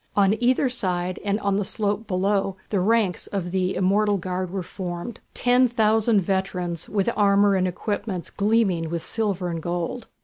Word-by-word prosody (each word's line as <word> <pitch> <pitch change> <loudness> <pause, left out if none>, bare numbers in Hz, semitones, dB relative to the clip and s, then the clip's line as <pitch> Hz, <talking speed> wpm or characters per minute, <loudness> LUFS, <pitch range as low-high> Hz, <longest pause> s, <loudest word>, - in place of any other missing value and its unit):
On 200 0 +4
either 255 +2 +3
side 185 -7 -1
and 205 +1 0
on 200 -1 +1
the 205 - 0
slope 205 +2 -2
below 195 0 0
the 200 - +2
ranks 205 -1 +1
of 180 -3 -3
the 185 0 0
"Immortal 200 +2 +2
Guard" 185 0 -3
were 190 0 -3
formed, 175 +5 -6 0.2
ten 250 +1 +4
thousand 220 -2 +3
veterans, 180 -2 -2
with 205 +2 +1
armour 200 -1 +4
and 185 -1 +2
equipments 185 0 -3
gleaming 200 -6 +1
with 170 0 -3
silver 200 -5 -1
and 165 -1 -3
gold. 175 +7 -3
195 Hz, 165 wpm, -24 LUFS, 180-210 Hz, 0.2 s, On